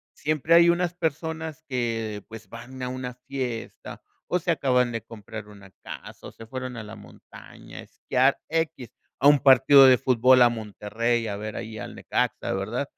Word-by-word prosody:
siempre 155 Hz, +2 st, 0 dB
hay 170 Hz, 0 st, +7 dB
unas 175 Hz, 0 st, 0 dB
personas 160 Hz, -1 st, -4 dB
que, 115 Hz, -5 st, -3 dB
pues 115 Hz, -1 st, -11 dB
van 125 Hz, +3 st, -11 dB
a 125 Hz, -, -2 dB
una 125 Hz, -1 st, -5 dB
fiesta 125 Hz, -4 st, -6 dB, 0.3 s
o 180 Hz, -, +1 dB
se 175 Hz, 0 st, -2 dB
acaban 125 Hz, -5 st, +1 dB
de 115 Hz, -, -4 dB
comprar 110 Hz, -1 st, -10 dB
una 100 Hz, -2 st, -15 dB
casa -, -, -10 dB
o -, -, -12 dB
se 115 Hz, -, -13 dB
fueron 130 Hz, +1 st, -6 dB
a 115 Hz, -, -6 dB
la 105 Hz, +1 st, -10 dB
montaña 105 Hz, -, -14 dB
a -, -, -7 dB
esquiar, 130 Hz, +2 st, 0 dB
equis, 160 Hz, -7 st, -3 dB, 0.3 s
a 135 Hz, -, +1 dB
un 145 Hz, -1 st, +7 dB
partido 135 Hz, +1 st, +7 dB
de 130 Hz, -1 st, +6 dB
fútbol 130 Hz, 0 st, +4 dB
a 120 Hz, -, +7 dB
Monterrey, 115 Hz, +1 st, -2 dB
a 100 Hz, -2 st, -4 dB
ver 110 Hz, +1 st, -6 dB
ahí 110 Hz, -1 st, -7 dB
al -, -, -8 dB
Necaxa, -, -, -2 dB
¿verdad? 110 Hz, +8 st, -3 dB
125 Hz, 180 wpm, -25 LUFS, 115-140 Hz, 0.3 s, hay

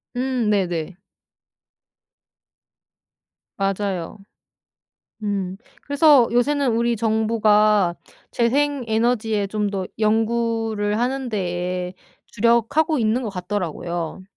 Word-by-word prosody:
음 250 Hz, -3 st, 0 dB
네네. 180 Hz, -3 st, -1 dB, 2.6 s
맞아요. 195 Hz, -2 st, -2 dB, 1.0 s
음. 195 Hz, -2 st, -2 dB, 0.3 s
그래서 285 Hz, -4 st, +5 dB
요새는 265 Hz, +1 st, +2 dB
우리 235 Hz, 0 st, +1 dB
정부가 215 Hz, -4 st, +2 dB, 0.4 s
재생 275 Hz, +3 st, +1 dB
에너지에 220 Hz, -2 st, +1 dB
좀 210 Hz, 0 st, -2 dB
더 190 Hz, -2 st, -3 dB
연구를 225 Hz, -1 st, 0 dB
하는 260 Hz, +2 st, -1 dB
데에 180 Hz, -3 st, -3 dB, 0.3 s
주력하고 235 Hz, +8 st, +2 dB
있는 225 Hz, +3 st, +1 dB
것 225 Hz, -, -3 dB
같더라고요. 180 Hz, -2 st, -4 dB
215 Hz, 190 characters per minute, -22 LUFS, 195-235 Hz, 2.6 s, 그래서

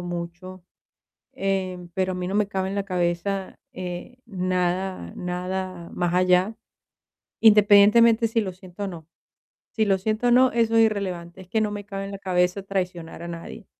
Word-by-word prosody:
mucho, 175 Hz, +1 st, -7 dB, 0.7 s
eh, 185 Hz, -2 st, -2 dB
pero 185 Hz, 0 st, 0 dB
a -, -, -4 dB
mí 180 Hz, -, -3 dB
no 190 Hz, -, -3 dB
me 210 Hz, -1 st, +2 dB
cabe 190 Hz, -2 st, -2 dB
en 195 Hz, -, -4 dB
la 200 Hz, -, 0 dB
cabeza, 185 Hz, +1 st, -2 dB
eh, 180 Hz, +6 st, -6 dB
nada 185 Hz, -, -2 dB
nada 180 Hz, 0 st, -4 dB
más 175 Hz, -1 st, 0 dB
allá, 185 Hz, +4 st, +3 dB, 0.8 s
independientemente 220 Hz, +2 st, +6 dB
si 225 Hz, 0 st, +1 dB
lo 190 Hz, -2 st, -4 dB
siento 185 Hz, +1 st, -11 dB
o -, -, -2 dB
no. 170 Hz, -4 st, -8 dB, 0.6 s
Si 220 Hz, -, +1 dB
lo 195 Hz, -1 st, +3 dB
siento 215 Hz, +4 st, -1 dB
o -, -, +4 dB
no, 255 Hz, +1 st, +5 dB
eso 230 Hz, -1 st, +2 dB
es 225 Hz, -, +7 dB
irrelevante, 185 Hz, -5 st, -4 dB
es 180 Hz, -, -17 dB
que 220 Hz, +2 st, 0 dB
no 210 Hz, -, 0 dB
me 205 Hz, -1 st, -6 dB
cabe 195 Hz, -1 st, -5 dB
en -, -, -7 dB
la 195 Hz, -, -6 dB
cabeza 185 Hz, 0 st, 0 dB
traicionar 180 Hz, -4 st, -4 dB
a 170 Hz, -, -6 dB
nadie. 170 Hz, +5 st, -8 dB
190 Hz, 180 wpm, -24 LUFS, 180-205 Hz, 0.8 s, es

